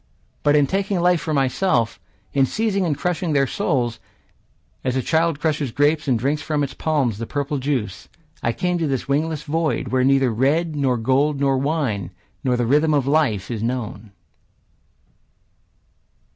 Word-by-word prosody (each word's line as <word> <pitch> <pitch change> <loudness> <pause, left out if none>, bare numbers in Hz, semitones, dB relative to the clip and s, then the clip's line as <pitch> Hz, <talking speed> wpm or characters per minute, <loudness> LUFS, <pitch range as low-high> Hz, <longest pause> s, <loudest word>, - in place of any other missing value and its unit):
But 145 0 +3
in 145 -1 +5
taking 195 +4 -1
life 175 -1 +3
for 160 - -3
myself, 135 - +1 0.3
In 135 -1 +3
seizing 200 - 0
and 145 -4 -1
crushing 175 0 -1
their 140 -1 +3
souls, 125 - -1 0.8
As 125 - -1
a 130 - 0
child 165 -2 +1
crushes 150 -4 -1
grapes 150 +4 +1
and 125 -3 +3
drinks 140 +6 -1
From 150 -2 -1
its 135 -2 -3
palms 135 -10 0
the 115 - -4
purple 145 0 -2
juice, 125 -9 -3 0.3
I 115 - +1
came 180 +7 -1
to 165 - 0
this 135 -3 -2
wingless 150 +2 -1
void, 160 +1 -1
Where 130 0 +2
neither 135 -1 +3
red, 150 +7 +1
nor 135 -4 +1
gold, 135 +5 +1
nor 135 -1 +2
wine, 135 - -1 0.3
Nor 125 -1 +1
the 120 - 0
rhythm 150 +5 +3
of 140 -3 +1
life 135 -9 +1
are 115 - -3
known. 115 -3 -4
140 Hz, 165 wpm, -22 LUFS, 125-160 Hz, 0.8 s, in